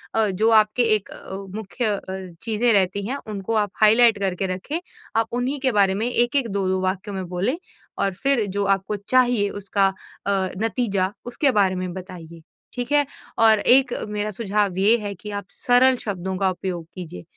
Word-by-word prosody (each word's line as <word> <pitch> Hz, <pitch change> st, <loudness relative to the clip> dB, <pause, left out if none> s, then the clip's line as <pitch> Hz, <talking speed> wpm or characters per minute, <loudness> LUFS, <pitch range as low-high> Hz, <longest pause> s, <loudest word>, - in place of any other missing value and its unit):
अ, 220 Hz, -1 st, +3 dB
जो 215 Hz, +4 st, +1 dB
आपके 215 Hz, +3 st, 0 dB
एक 210 Hz, -, -4 dB
अ, 190 Hz, -, -9 dB, 0.2 s
मुख्य 220 Hz, +3 st, -4 dB
अ, -, -, -6 dB, 0.4 s
चीजें 230 Hz, +1 st, +1 dB
रहती 195 Hz, 0 st, +1 dB
हैं 270 Hz, +4 st, -2 dB
उनको 205 Hz, 0 st, -4 dB
आप 205 Hz, -, -15 dB
हाइलाइट 225 Hz, 0 st, +6 dB
करके 190 Hz, -1 st, -1 dB
रखें। 285 Hz, -, -4 dB, 0.4 s
आप 225 Hz, 0 st, +2 dB
उन्हीं 255 Hz, +4 st, -1 dB
के 265 Hz, -1 st, +1 dB
बारे 200 Hz, -3 st, +3 dB
में 220 Hz, +4 st, -1 dB
1-1, 240 Hz, +2 st, +2 dB
2-2 190 Hz, -1 st, 0 dB
वाक्यों 190 Hz, +2 st, -2 dB
में 190 Hz, -1 st, -3 dB
बोलें 190 Hz, -, -1 dB, 0.4 s
और 195 Hz, -, +1 dB
फिर 245 Hz, +3 st, +1 dB
जो 200 Hz, +1 st, -2 dB
आपको 195 Hz, +1 st, 0 dB
चाहिए 245 Hz, -5 st, +3 dB
उसका 200 Hz, 0 st, 0 dB, 0.4 s
अ, -, -, +2 dB, 0.3 s
नतीजा 200 Hz, -4 st, 0 dB
उसके 265 Hz, +3 st, +1 dB
बारे 195 Hz, -5 st, +2 dB
में 185 Hz, -1 st, -4 dB
बताइए। 170 Hz, -3 st, -10 dB, 0.3 s
ठीक 245 Hz, +2 st, -4 dB
है? 290 Hz, 0 st, +4 dB, 0.3 s
और 220 Hz, -1 st, +6 dB
एक 250 Hz, +2 st, +4 dB, 0.2 s
मेरा 210 Hz, 0 st, -2 dB
सुझाव 205 Hz, -3 st, -1 dB
ये 210 Hz, +5 st, +4 dB
है 205 Hz, -3 st, -5 dB
कि 210 Hz, +4 st, -9 dB
आप 200 Hz, -1 st, -4 dB
सरल 255 Hz, +1 st, +4 dB
शब्दों 190 Hz, -2 st, -3 dB
का 190 Hz, -1 st, +2 dB
उपयोग 180 Hz, -2 st, -5 dB
कीजिए। 165 Hz, -, -8 dB
205 Hz, 180 wpm, -23 LUFS, 190-235 Hz, 0.4 s, हाइलाइट